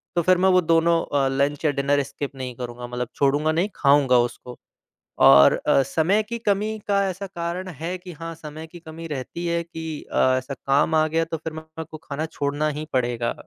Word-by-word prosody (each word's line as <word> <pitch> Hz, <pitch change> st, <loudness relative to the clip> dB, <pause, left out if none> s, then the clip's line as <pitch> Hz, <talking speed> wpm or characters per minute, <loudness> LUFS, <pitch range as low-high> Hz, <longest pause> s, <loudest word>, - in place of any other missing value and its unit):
तो 170 Hz, -, +3 dB
फिर 185 Hz, +1 st, +4 dB
मैं 190 Hz, +1 st, +3 dB
वो 185 Hz, 0 st, +5 dB
दोनों 165 Hz, 0 st, +3 dB
अ, 140 Hz, -2 st, +1 dB
लंच 140 Hz, +3 st, 0 dB
या 150 Hz, -, +4 dB
डिनर 140 Hz, 0 st, +1 dB
स्किप 140 Hz, 0 st, -6 dB
नहीं 130 Hz, -2 st, -6 dB
करूँगा, 120 Hz, 0 st, -7 dB
मतलब 125 Hz, 0 st, -4 dB
छोड़ूँगा 145 Hz, +3 st, +2 dB
नहीं, 175 Hz, +6 st, 0 dB
खाऊँगा 140 Hz, -3 st, +4 dB
उसको। 125 Hz, +1 st, -12 dB, 0.7 s
और 70 Hz, +1 st, +8 dB
अ, 135 Hz, -, +5 dB
समय 165 Hz, +10 st, +1 dB
की 235 Hz, +2 st, -5 dB
कमी 215 Hz, 0 st, 0 dB
का 200 Hz, -1 st, +2 dB
ऐसा 190 Hz, +2 st, -5 dB
कारण 175 Hz, +1 st, -4 dB
है 175 Hz, +2 st, -5 dB
कि 180 Hz, 0 st, -11 dB
हाँ, 165 Hz, +2 st, -7 dB
समय 155 Hz, 0 st, -9 dB
की 175 Hz, +2 st, -12 dB
कमी 165 Hz, 0 st, -9 dB
रहती 150 Hz, +4 st, -5 dB
है 170 Hz, 0 st, 0 dB
कि 160 Hz, -2 st, -7 dB
अ, -, -, -2 dB, 0.2 s
ऐसा 130 Hz, +2 st, -4 dB
काम 140 Hz, +4 st, +1 dB
आ 155 Hz, 0 st, +4 dB
गया, 165 Hz, +1 st, +1 dB
तो 165 Hz, 0 st, -4 dB
फिर 160 Hz, 0 st, -6 dB
मेरे 160 Hz, +1 st, -8 dB
को 155 Hz, -, -7 dB
खाना 155 Hz, 0 st, -5 dB
छोड़ना 145 Hz, -1 st, -2 dB
ही 155 Hz, -, -4 dB
पड़ेगा 120 Hz, -2 st, 0 dB
155 Hz, 210 wpm, -23 LUFS, 140-170 Hz, 0.7 s, और